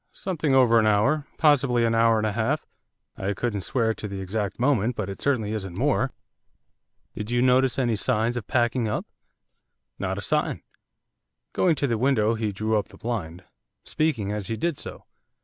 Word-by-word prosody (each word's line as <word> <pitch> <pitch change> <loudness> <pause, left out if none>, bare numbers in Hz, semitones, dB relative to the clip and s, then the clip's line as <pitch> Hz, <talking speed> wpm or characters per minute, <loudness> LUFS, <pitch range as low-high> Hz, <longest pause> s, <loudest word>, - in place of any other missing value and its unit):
'Something 160 -7 -1
over 120 -3 +5
an 110 - +3
hour, 120 +9 +2
possibly 135 -6 +3
an 115 - +1
hour 115 0 +4
and 110 - 0
a 110 - 0
half; 115 +8 -1 0.5
I 100 +1 -2
couldn't 105 -2 -2
swear 115 +2 0
to 105 - -6
the 100 -1 -6
exact 100 +2 -3
moment, 125 -3 +2
but 100 -3 -3
it 95 - -9
certainly 115 -7 0
isn't 95 -5 -5
more.' - - +1 1.1
'Did 105 +1 -5
you 120 0 +1
notice 130 0 +3
any 120 -4 +1
signs 115 +1 +1
of 115 -5 -5
packing 120 -1 +1
up?' 105 - -2 0.9
'Not - - -2
a - - -3
sign.' - - -1 0.9
Going 175 -3 +3
to 140 - 0
the 115 -5 0
window 115 -4 +2
he 110 -2 -2
drew 110 +2 0
up 100 - -5
the - - -16
blind, 95 -7 -4 0.4
speaking 130 -11 -1
as 105 -2 -3
he 110 - -3
did 170 +7 -1
so. - - -9
115 Hz, 185 wpm, -25 LUFS, 105-130 Hz, 1.1 s, over